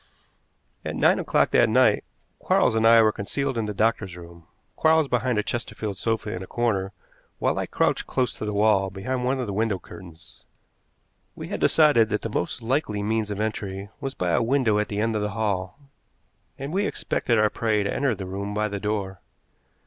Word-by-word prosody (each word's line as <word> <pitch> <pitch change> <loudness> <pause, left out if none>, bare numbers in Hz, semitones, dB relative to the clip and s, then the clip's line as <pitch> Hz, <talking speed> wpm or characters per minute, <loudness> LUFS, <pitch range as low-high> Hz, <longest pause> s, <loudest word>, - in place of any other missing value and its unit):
At - - -4
nine - - +3
o'clock - - +1
that - - +4
night - - +4 0.4
Quarles - - +2
and 110 0 +3
I 115 0 +7
were 110 - +4
concealed 135 +7 -3
in 115 -2 -1
the - - -2
doctor's 105 -4 0
room, 85 -1 -13 0.3
Quarles 160 -1 +3
behind 125 -2 0
a 105 - +1
chesterfield 110 -4 -4
sofa 110 0 -1
in 90 - -5
a 95 - -8
corner, 100 -5 -1 0.5
while - - 0
I - - -2
crouched - - 0
close 125 -2 0
to - - -6
the 105 - -2
wall 100 -2 +3
behind 125 +7 -3
one 130 +1 0
of 125 - -1
the 100 - -4
window 110 -1 0
curtains. 85 -2 -14 0.9
We - - -8
had - - -3
decided 145 -9 +4
that 105 - -2
the 115 - -3
most 105 +3 -3
likely 115 -5 -1
means 110 0 -1
of 105 -1 -4
entry 100 -2 -3
was 135 0 -5
by 90 -1 -1
a 85 - +2
window 115 -3 +2
at 105 - 0
the 105 - -4
end 110 +1 0
of 105 - 0
the 105 - -1
hall, 100 -3 -2 0.8
and 140 +4 -6
we 200 +2 +1
expected 115 - -1
our 110 0 +3
prey 110 -3 0
to 100 - -2
enter 135 -5 +1
the 95 -1 -6
room 100 +2 -5
by 105 0 0
the 100 0 -4
door. 100 -3 -3
105 Hz, 200 wpm, -25 LUFS, 100-115 Hz, 0.9 s, I